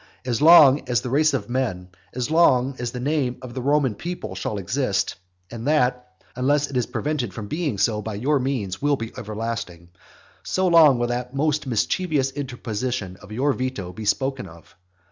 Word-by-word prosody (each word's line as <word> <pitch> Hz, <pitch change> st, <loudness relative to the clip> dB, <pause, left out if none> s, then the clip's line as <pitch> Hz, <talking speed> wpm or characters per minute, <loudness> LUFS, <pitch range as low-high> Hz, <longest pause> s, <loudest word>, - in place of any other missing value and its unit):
As 120 Hz, -1 st, -1 dB
long 150 Hz, -4 st, +7 dB
as 120 Hz, -1 st, +2 dB
the 125 Hz, -, -5 dB
race 155 Hz, +3 st, +3 dB
of 105 Hz, -7 st, -3 dB
men, 115 Hz, -8 st, -2 dB, 0.3 s
as 125 Hz, +3 st, -2 dB
long 135 Hz, -5 st, +4 dB
as 120 Hz, -1 st, -2 dB
the 125 Hz, -, -6 dB
name 135 Hz, -2 st, -1 dB
of 125 Hz, -2 st, -8 dB
the 130 Hz, -, -4 dB
Roman 140 Hz, -2 st, +2 dB
people 175 Hz, -, -6 dB
shall 95 Hz, +3 st, -4 dB
exist, 100 Hz, +1 st, -1 dB, 0.4 s
(and 115 Hz, +2 st, -6 dB
that, 125 Hz, -4 st, +1 dB, 0.2 s
unless 140 Hz, +3 st, +1 dB
it -, -, -7 dB
is 125 Hz, -2 st, +1 dB
prevented 130 Hz, -10 st, -3 dB
from 110 Hz, -3 st, -6 dB
being 150 Hz, -, -2 dB
so 105 Hz, +2 st, +1 dB
by 110 Hz, -1 st, -5 dB
your 140 Hz, +7 st, +1 dB
means, 120 Hz, -8 st, -3 dB
will 145 Hz, 0 st, +2 dB
be 115 Hz, -3 st, -6 dB
everlasting,) 105 Hz, -6 st, -5 dB, 0.5 s
so 185 Hz, 0 st, 0 dB
long 160 Hz, -6 st, +6 dB
will 120 Hz, -, 0 dB
that 125 Hz, +2 st, -4 dB
most 150 Hz, 0 st, 0 dB
mischievous 135 Hz, -, 0 dB
interposition 125 Hz, -7 st, -4 dB
of 105 Hz, 0 st, -15 dB
your 135 Hz, +6 st, +1 dB
veto 125 Hz, -9 st, -4 dB
be 110 Hz, +2 st, -7 dB
spoken 135 Hz, +4 st, -1 dB
of. 80 Hz, 0 st, -16 dB
125 Hz, 185 wpm, -23 LUFS, 110-145 Hz, 0.5 s, long